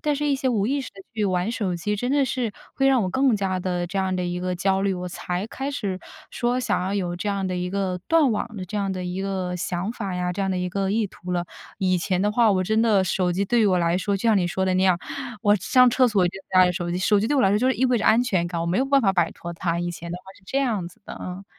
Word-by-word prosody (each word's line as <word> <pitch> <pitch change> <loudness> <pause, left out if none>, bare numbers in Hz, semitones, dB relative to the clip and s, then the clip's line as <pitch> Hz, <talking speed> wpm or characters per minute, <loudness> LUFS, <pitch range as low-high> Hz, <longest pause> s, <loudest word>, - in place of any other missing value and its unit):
但 295 -1 0
是 295 +1 -1
一 280 - +2
些 265 -1 -1
无 210 -4 +1
意 280 +2 0
识 260 - -6
地 195 - -12
去 210 -2 0
玩 185 +2 0
手 190 -7 -2
机 210 +5 -2
真 245 +5 -2
的 280 -1 +3
是 250 -3 -2 0.2
会 270 - +2
让 260 -5 +4
我 185 - -1
更 260 0 +3
加 190 -2 -1
地 180 -1 -2
这 195 +3 -3
样 190 -1 0
的 180 - -1
一 175 0 -3
个 180 0 -2
焦 190 +1 +1
虑， 195 -1 +1
我 180 0 -5
才 180 +3 -4
开 270 +4 -4
始 200 -9 -3 0.3
说 245 +1 0
想 220 -7 0
要 190 +2 -2
有 180 -3 -1
这 205 +4 -3
样 195 -1 -1
的 185 - -2
一 180 0 -2
个 190 -2 -2
断 315 -7 +4
网 220 +1 -3
的 185 - -4
这 205 +3 -4
样 195 -1 -1
的 185 -1 -4
一 180 +2 -3
个 190 -2 -2
想 180 +5 -3
法 200 -6 -4
呀， 180 0 -1
这 200 - -5
样 195 - 0
的 185 - -1
一 180 0 -2
个 195 0 -1
意 215 0 +1
图 180 -1 -8
了。 175 0 0 0.3
以 185 -2 +1
前 185 +1 0
的 210 0 +1
话， 230 -1 +4
我 185 -2 +1
真 220 +4 +2
的 210 -5 +3
手 180 0 0
机 190 +3 0
对 235 +3 +2
于 215 - +4
我 185 -2 +3
来 170 +1 +1
说， 200 +1 0
就 195 - -7
像 220 -3 +4
你 175 - +1
说 190 +2 -1
的 185 - +1
那 185 - +2
样， 185 -2 +4 0.4
我 205 -1 +5
上 250 +6 +4
厕 255 +1 +4
所 195 -5 +2
就 175 - -3 0.2
带 185 -1 +6
着 180 - +1
手 175 0 -3
机。 175 - -1
手 200 +2 +3
机 220 - 0
对 290 - +1
我 265 - +4
来 190 - +4
说 205 - +3
就 255 +3 +2
意 260 0 +1
味 250 -2 +3
着 - - -1
安 230 +3 +5
全 185 -8 0
感， 170 -1 -4
我 165 - -1
没 175 +3 +1
有 265 - +1
办 275 -1 +3
法 195 -2 +3
摆 175 -3 +2
脱 170 0 -7
它。 170 0 -2
以 175 0 -2
前 170 0 -8
的 175 - -3
话 185 - -21
是 - - -26
这 275 - -1
样 215 -10 -1
子 - - -21
的， - - -8
嗯。 185 +2 -6
195 Hz, 335 characters per minute, -24 LUFS, 180-225 Hz, 0.4 s, 带